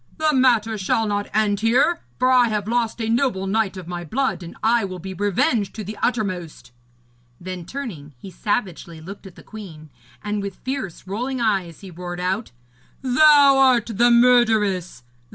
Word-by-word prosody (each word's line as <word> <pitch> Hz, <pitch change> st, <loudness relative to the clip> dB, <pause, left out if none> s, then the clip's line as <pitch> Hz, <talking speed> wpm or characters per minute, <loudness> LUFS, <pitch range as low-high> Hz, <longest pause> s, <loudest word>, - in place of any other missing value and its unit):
The 310 Hz, -1 st, +1 dB
matter 230 Hz, -5 st, +2 dB
shall 210 Hz, +4 st, 0 dB
not 205 Hz, -1 st, -2 dB
end 210 Hz, -2 st, +1 dB
here, 250 Hz, +10 st, +2 dB, 0.2 s
for 255 Hz, +1 st, +2 dB
I 250 Hz, -2 st, +5 dB
have 210 Hz, -2 st, -2 dB
lost 235 Hz, 0 st, -1 dB
a 225 Hz, -, -2 dB
noble 230 Hz, -4 st, 0 dB
knight 200 Hz, 0 st, -1 dB
of 180 Hz, -2 st, -9 dB
my 175 Hz, 0 st, -5 dB
blood, 215 Hz, -, -2 dB
and 170 Hz, -1 st, -10 dB
I 230 Hz, 0 st, +3 dB
will 185 Hz, -2 st, -5 dB
be 190 Hz, +2 st, -7 dB
revenged 205 Hz, +2 st, 0 dB
to 215 Hz, -, -5 dB
the 210 Hz, +3 st, -7 dB
uttermost.' 185 Hz, -, -3 dB, 0.7 s
Then, 180 Hz, -1 st, -7 dB
turning, 175 Hz, -, -7 dB
he 190 Hz, +9 st, -11 dB
savagely 180 Hz, -6 st, -3 dB
looked 195 Hz, +5 st, -10 dB
at 185 Hz, -, -14 dB
the -, -, -15 dB
queen, 165 Hz, -9 st, -11 dB, 0.3 s
and 210 Hz, 0 st, -2 dB
with 200 Hz, -1 st, -6 dB
fierce 260 Hz, -10 st, -6 dB
rolling 245 Hz, +7 st, -3 dB
eyes 195 Hz, -8 st, -1 dB
he 195 Hz, -2 st, -10 dB
roared 175 Hz, +1 st, -7 dB
out: 190 Hz, +5 st, -2 dB, 0.5 s
'Thou 280 Hz, +1 st, +6 dB
art 250 Hz, -4 st, +3 dB
the 240 Hz, +4 st, +4 dB
murderess! 220 Hz, -, +3 dB
210 Hz, 170 wpm, -22 LUFS, 185-240 Hz, 0.7 s, Thou